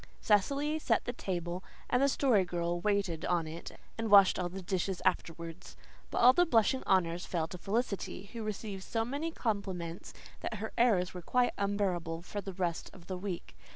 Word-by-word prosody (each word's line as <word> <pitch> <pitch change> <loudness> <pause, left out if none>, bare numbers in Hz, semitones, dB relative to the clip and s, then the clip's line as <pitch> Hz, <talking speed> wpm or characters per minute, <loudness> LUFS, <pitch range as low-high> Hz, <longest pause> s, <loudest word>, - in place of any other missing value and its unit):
Cecily 280 +9 +2
set 230 -7 +1
the 245 - -2
table, 180 -4 -3 0.2
and 250 - +2
the 275 - +5
Story 255 -8 +3
Girl 175 -1 -2
waited 195 -5 0
on 175 -2 +1
it 160 +2 -8 0.2
and 225 -1 -1
washed 200 -2 +7
all 180 -1 -1
the 190 +1 -7
dishes 185 0 -1
afterwards. 170 -2 -2 0.3
But - - -4
all 250 +2 +9
the 355 - +5
blushing 240 0 +3
honours 175 -2 +2
fell 165 -3 -1
to 180 - -7
Felicity, 200 -1 -2
who 230 - -5
received 210 -2 -4
so 225 +4 -1
many 285 +7 -2
compliments 190 - -3 0.3
that - - -4
her 220 +1 -5
airs 205 -7 +3
were 180 - -6
quite 250 +8 +2
unbearable 185 -5 -1
for 205 +3 -5
the 195 0 -6
rest 175 -2 -2
of 180 -3 -14
the 185 - -4
week. 180 - -5
195 Hz, 185 wpm, -32 LUFS, 175-225 Hz, 0.3 s, all